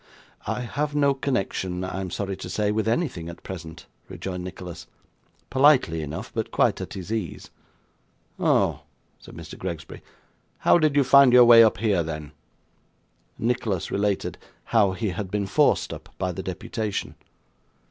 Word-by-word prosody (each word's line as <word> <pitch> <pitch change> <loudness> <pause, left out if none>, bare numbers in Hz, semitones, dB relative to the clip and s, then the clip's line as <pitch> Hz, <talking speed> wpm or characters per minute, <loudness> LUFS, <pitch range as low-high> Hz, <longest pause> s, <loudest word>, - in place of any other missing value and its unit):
'I - - -2
have 145 +6 -3
no 140 -1 +3
connection, 95 -9 -2
I 95 +1 -4
am 95 - -4
sorry 100 +2 -3
to - - -8
say, 105 -1 0
with 110 0 -1
anything 115 - -1
at 85 - -11
present,' 80 -4 -8 0.2
rejoined 90 -1 -5
Nicholas, 90 -2 -8 0.6
politely 130 - +4
enough, 75 +1 -6
but - - -2
quite - - +1
at - - -6
his 95 +1 -7
ease. 105 -8 -5 0.9
'Oh!' - - +2 0.4
said - - -14
Mr. - - -10
Gregsbury. 85 -4 -6 0.6
'How - - +4
did 155 -3 +2
you 145 - +5
find 135 -1 +6
your 125 -1 +9
way 115 -1 +9
up 110 - +3
here, 100 -4 +1
then?' 75 -2 -5 1.1
Nicholas 110 -6 -1
related 100 -1 -1 0.2
how 105 -5 +2
he 105 +2 -2
had 95 +2 -4
been 100 0 -1
forced 95 - +2
up - - -10
by 90 -1 -1
the 90 - -5
deputation. 105 +3 -4
100 Hz, 155 wpm, -25 LUFS, 90-120 Hz, 1.1 s, your